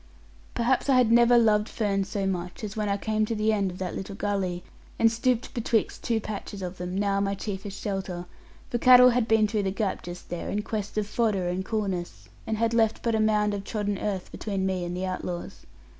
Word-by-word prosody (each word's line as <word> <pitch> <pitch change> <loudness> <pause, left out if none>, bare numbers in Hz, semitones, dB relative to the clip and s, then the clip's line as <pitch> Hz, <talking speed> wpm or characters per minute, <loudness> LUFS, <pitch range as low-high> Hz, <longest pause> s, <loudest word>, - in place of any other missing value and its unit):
Perhaps 250 +3 +1
I 270 - +5
had 245 -3 +4
never 240 +1 +6
loved 215 -2 +3
ferns 200 -3 -1
so 200 -1 -2
much 180 -1 -3
as 210 0 -5
when 210 -1 -1
I 200 - +1
came 215 +1 0
to 230 - -2
the 215 +1 +2
end 200 -2 +1
of 180 - -8
that 185 -1 -4
little 195 +1 -6
gully, 190 -4 -2 0.3
and 225 0 +4
stooped 240 +1 0
betwixt 230 -3 0
two 230 -2 +1
patches 205 -2 -6
of 180 0 -6
them, 180 +1 -4
now 200 -1 +1
my 200 0 0
chiefest 200 0 -5
shelter, 190 -3 -4 0.5
for 240 - 0
cattle 250 +1 +8
had 240 -1 +1
been 220 -1 +4
through 210 0 0
the 195 - 0
gap 195 0 -2
just 175 0 -9
there, 175 - -4
in 210 +1 -1
quest 210 -1 -4
of 210 - +1
fodder 205 -4 0
and 180 +2 -2
coolness, 195 -5 -3 0.2
and 220 - -1
had 230 +1 +1
left 225 -2 +2
but 230 - +1
a 220 - +2
mound 210 -1 +2
of 200 -1 -3
trodden 205 -2 -2
earth 195 -3 -3
between 195 -3 -3
me 190 -2 -1
and 175 +1 -4
the 185 - -2
outlaws. 180 -1 -5
205 Hz, 220 wpm, -27 LUFS, 190-225 Hz, 0.5 s, cattle